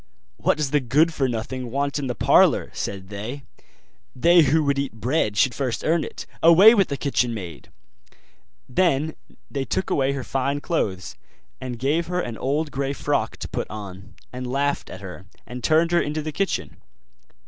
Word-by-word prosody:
'What -, -, +1 dB
does 150 Hz, -3 st, -1 dB
the 150 Hz, -, +3 dB
good 145 Hz, +6 st, +2 dB
for 135 Hz, -4 st, 0 dB
nothing 120 Hz, +2 st, -4 dB
want 140 Hz, +3 st, -1 dB
in 140 Hz, -, -3 dB
the 125 Hz, -, -3 dB
parlour?' -, -, +4 dB
said 95 Hz, -1 st, -5 dB
they; 110 Hz, +7 st, -6 dB, 0.7 s
'they 170 Hz, +6 st, +5 dB
who 155 Hz, +4 st, +3 dB
would 140 Hz, -1 st, +1 dB
eat 140 Hz, -4 st, -3 dB
bread 110 Hz, -1 st, -1 dB
should 120 Hz, +5 st, +3 dB
first 125 Hz, -2 st, -3 dB
earn 160 Hz, 0 st, +2 dB
it; -, -, -7 dB, 0.2 s
away 180 Hz, +7 st, +8 dB
with 195 Hz, -5 st, +3 dB
the 140 Hz, -, -3 dB
kitchen 125 Hz, -4 st, 0 dB
maid!' 90 Hz, -7 st, -8 dB, 1.0 s
Then 155 Hz, 0 st, +1 dB, 0.4 s
they 140 Hz, -2 st, -2 dB
took 155 Hz, +8 st, -2 dB
away 135 Hz, 0 st, +1 dB
her 135 Hz, -2 st, -4 dB
fine 135 Hz, +3 st, -1 dB
clothes, 100 Hz, -, -2 dB, 0.5 s
and 125 Hz, -2 st, -5 dB
gave 150 Hz, +7 st, 0 dB
her 180 Hz, +1 st, -1 dB
an 120 Hz, -9 st, -3 dB
old 145 Hz, +3 st, -1 dB
grey 135 Hz, 0 st, -2 dB
frock -, -, -1 dB
to -, -, -6 dB
put -, -, -4 dB
on, 100 Hz, 0 st, -9 dB, 0.2 s
and 125 Hz, 0 st, -5 dB
laughed 140 Hz, +2 st, -1 dB
at 95 Hz, -, -9 dB
her, 95 Hz, 0 st, -9 dB, 0.2 s
and 125 Hz, 0 st, -8 dB
turned 160 Hz, +4 st, +3 dB
her 175 Hz, -, +4 dB
into 150 Hz, +1 st, -3 dB
the 155 Hz, -, -4 dB
kitchen. 195 Hz, +6 st, -2 dB
135 Hz, 180 wpm, -23 LUFS, 120-155 Hz, 1.0 s, away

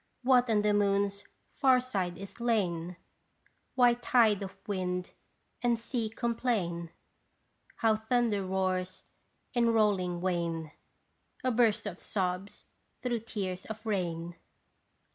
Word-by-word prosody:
What 250 Hz, -1 st, +4 dB
on 210 Hz, -2 st, +3 dB
the 210 Hz, 0 st, +3 dB
moon's 200 Hz, 0 st, +1 dB, 0.3 s
far 260 Hz, -2 st, +4 dB
side 190 Hz, -9 st, -2 dB
is 195 Hz, +5 st, -9 dB
lain? 180 Hz, -7 st, 0 dB, 0.8 s
Why 245 Hz, -2 st, +6 dB
tide 235 Hz, -4 st, +3 dB
of 195 Hz, -1 st, -6 dB
wind 180 Hz, -2 st, -2 dB, 0.5 s
and 240 Hz, -1 st, +2 dB
sea 230 Hz, -1 st, -2 dB
complain? 225 Hz, -8 st, -1 dB, 0.9 s
How 225 Hz, -1 st, +3 dB
thunder 220 Hz, -2 st, +1 dB
roars 185 Hz, -1 st, -1 dB, 0.5 s
in 235 Hz, -2 st, +3 dB
rolling 195 Hz, -6 st, +2 dB
wane 170 Hz, -3 st, -1 dB, 0.7 s
A 255 Hz, -, +2 dB
burst 230 Hz, -3 st, +3 dB
of 195 Hz, -3 st, -5 dB
sobs 185 Hz, 0 st, -3 dB, 0.4 s
through 240 Hz, -2 st, 0 dB
tears 195 Hz, -4 st, -4 dB
of 220 Hz, +1 st, -7 dB
rain 175 Hz, -5 st, -2 dB
205 Hz, 115 wpm, -30 LUFS, 180-235 Hz, 0.9 s, Why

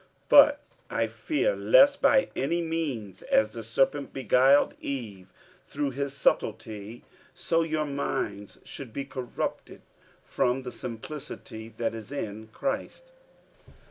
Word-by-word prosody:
47:011:003 -, -, -33 dB, 0.2 s
But -, -, +8 dB, 0.3 s
I -, -, 0 dB
fear, 345 Hz, +10 st, -1 dB
lest 285 Hz, -, +5 dB
by 275 Hz, -1 st, +4 dB
any 165 Hz, +6 st, 0 dB
means, 145 Hz, -, -3 dB
as 110 Hz, 0 st, +2 dB
the 115 Hz, 0 st, -7 dB
serpent 135 Hz, +5 st, 0 dB
beguiled 135 Hz, +2 st, +4 dB
Eve 110 Hz, -9 st, -5 dB, 0.4 s
through 145 Hz, -1 st, -3 dB
his 140 Hz, +1 st, -3 dB
subtilty, 110 Hz, -2 st, -1 dB, 0.3 s
so 170 Hz, -1 st, +1 dB
your 155 Hz, -2 st, -1 dB
minds 105 Hz, -8 st, -3 dB
should 130 Hz, -6 st, -9 dB
be 140 Hz, -, -4 dB
corrupted 130 Hz, -3 st, -5 dB, 0.4 s
from 125 Hz, +2 st, 0 dB
the 125 Hz, -, -6 dB
simplicity 115 Hz, -2 st, -7 dB
that 115 Hz, -1 st, -1 dB
is 110 Hz, +1 st, -8 dB
in 110 Hz, -6 st, -5 dB
Christ. 280 Hz, -, -4 dB
135 Hz, 125 wpm, -27 LUFS, 110-155 Hz, 0.4 s, But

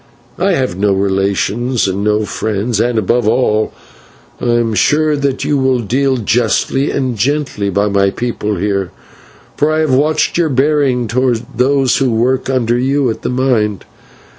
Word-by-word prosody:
I 195 Hz, +1 st, +2 dB
have 130 Hz, -, -1 dB
no 100 Hz, 0 st, +2 dB
relations 100 Hz, +4 st, 0 dB
and 95 Hz, +1 st, -2 dB
no 105 Hz, 0 st, +1 dB
friends, 110 Hz, +1 st, -2 dB
and, 120 Hz, 0 st, +1 dB
above 110 Hz, +2 st, +1 dB
all, 110 Hz, -2 st, +1 dB, 0.7 s
I -, -, -3 dB
am 120 Hz, -1 st, +1 dB
sure 150 Hz, +7 st, +2 dB
that 140 Hz, -2 st, -1 dB
you 145 Hz, -2 st, +1 dB
will 130 Hz, -1 st, +2 dB
deal 130 Hz, +4 st, 0 dB
justly 120 Hz, +4 st, 0 dB
and 130 Hz, -3 st, -1 dB
gently 130 Hz, -4 st, -1 dB
by 100 Hz, +2 st, +1 dB
my 100 Hz, -1 st, +2 dB
people 105 Hz, -1 st, -3 dB
here, 100 Hz, 0 st, -1 dB, 0.7 s
for 150 Hz, +1 st, +2 dB
I 155 Hz, -, 0 dB
have 155 Hz, -4 st, +1 dB
watched 155 Hz, +5 st, +1 dB
your 165 Hz, -2 st, +2 dB
bearing 135 Hz, -3 st, +1 dB
towards 120 Hz, -1 st, 0 dB
those 130 Hz, +1 st, +2 dB
who 135 Hz, -2 st, +1 dB
work 125 Hz, +4 st, 0 dB
under 120 Hz, -2 st, +1 dB
you 135 Hz, 0 st, +1 dB
at -, -, -7 dB
the -, -, -3 dB
mine. 125 Hz, -6 st, 0 dB
120 Hz, 165 wpm, -15 LUFS, 105-135 Hz, 0.7 s, I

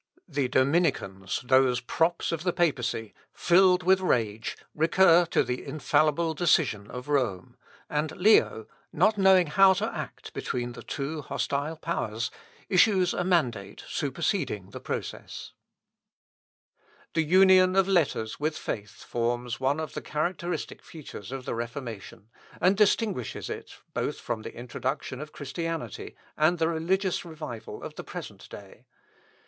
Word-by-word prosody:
The 145 Hz, -5 st, -1 dB
Dominicans, 130 Hz, -, 0 dB
those 130 Hz, -1 st, +4 dB
props 165 Hz, +7 st, 0 dB
of 165 Hz, -2 st, -2 dB
the 180 Hz, -, +1 dB
papacy, 125 Hz, -, -1 dB, 0.2 s
filled 180 Hz, 0 st, +4 dB
with 190 Hz, +2 st, +4 dB
rage, 115 Hz, -, -1 dB, 0.2 s
recur 170 Hz, +2 st, +5 dB
to -, -, +2 dB
the 125 Hz, 0 st, -3 dB
infallible 155 Hz, +3 st, +1 dB
decision 150 Hz, -, +2 dB
of 125 Hz, +2 st, -7 dB
Rome, 125 Hz, -11 st, -1 dB, 0.3 s
and 150 Hz, +1 st, -1 dB
Leo, 180 Hz, -, +4 dB, 0.3 s
not 215 Hz, -1 st, +2 dB
knowing 190 Hz, -2 st, +6 dB
how 190 Hz, +5 st, +6 dB
to 215 Hz, +4 st, -2 dB
act -, -, -7 dB
between 120 Hz, -1 st, -3 dB
the 120 Hz, -, -10 dB
two 150 Hz, +2 st, -4 dB
hostile 145 Hz, +3 st, -2 dB
powers, 115 Hz, -9 st, -3 dB, 0.4 s
issues 185 Hz, -2 st, +4 dB
a -, -, -1 dB
mandate 125 Hz, -, 0 dB
superseding 130 Hz, -, -2 dB
the -, -, -7 dB
process. -, -, -6 dB, 1.6 s
The 165 Hz, -, +2 dB
union 185 Hz, +2 st, +5 dB
of 195 Hz, -1 st, +4 dB
letters 155 Hz, -, +1 dB
with 155 Hz, +1 st, -1 dB
faith 105 Hz, -2 st, -6 dB
forms 120 Hz, 0 st, -2 dB
one 140 Hz, +3 st, +1 dB
of 155 Hz, -2 st, -5 dB
the -, -, -4 dB
characteristic 170 Hz, +3 st, -3 dB
features 135 Hz, -9 st, -10 dB
of 135 Hz, -1 st, -6 dB
the -, -, -2 dB
Reformation, 115 Hz, -3 st, -6 dB, 0.3 s
and 185 Hz, +2 st, +4 dB
distinguishes 205 Hz, -, 0 dB
it, -, -, -7 dB, 0.2 s
both -, -, -2 dB
from 110 Hz, -, -4 dB
the -, -, -8 dB
introduction 130 Hz, +2 st, -4 dB
of 150 Hz, -, -8 dB
Christianity, 165 Hz, +3 st, -5 dB, 0.2 s
and 155 Hz, +3 st, +3 dB
the 165 Hz, 0 st, +1 dB
religious 180 Hz, +3 st, 0 dB
revival 155 Hz, -9 st, -8 dB
of -, -, -6 dB
the -, -, -5 dB
present -, -, -9 dB
day. -, -, -12 dB
155 Hz, 135 wpm, -27 LUFS, 125-175 Hz, 1.6 s, knowing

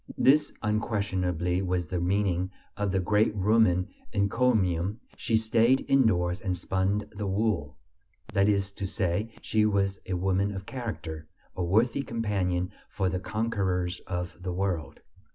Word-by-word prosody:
This 145 Hz, +2 st, +4 dB
unquestionably 95 Hz, -5 st, 0 dB
was 90 Hz, -2 st, -1 dB
the 90 Hz, +1 st, -2 dB
meaning 95 Hz, 0 st, +1 dB, 0.3 s
of 105 Hz, -2 st, -1 dB
the 95 Hz, -, +1 dB
great 105 Hz, +4 st, +2 dB
Roman 100 Hz, -3 st, +3 dB, 0.2 s
encomium: 100 Hz, -3 st, +1 dB, 0.2 s
"She 115 Hz, -, +1 dB
stayed 115 Hz, +4 st, +3 dB
indoors 90 Hz, -10 st, +3 dB
and 90 Hz, -2 st, -1 dB
spun 95 Hz, +3 st, 0 dB
the 100 Hz, 0 st, -4 dB
wool," 95 Hz, -6 st, 0 dB, 0.6 s
that 100 Hz, +1 st, +4 dB
is 100 Hz, -1 st, +1 dB
to 100 Hz, 0 st, -4 dB
say, 100 Hz, +2 st, -1 dB
she 110 Hz, -1 st, +2 dB
was 100 Hz, -2 st, +1 dB
a 95 Hz, -, -2 dB
woman 95 Hz, +2 st, 0 dB
of 95 Hz, 0 st, -6 dB
character, 90 Hz, -12 st, -5 dB, 0.3 s
a 90 Hz, -, -1 dB
worthy 115 Hz, +9 st, +2 dB
companion 100 Hz, -7 st, -1 dB, 0.2 s
for 95 Hz, -2 st, 0 dB
the 90 Hz, -, -2 dB
conquerors 95 Hz, -4 st, -1 dB
of 90 Hz, -2 st, -3 dB
the 90 Hz, 0 st, -3 dB
world. 90 Hz, -4 st, -2 dB
100 Hz, 140 wpm, -28 LUFS, 90-110 Hz, 0.6 s, This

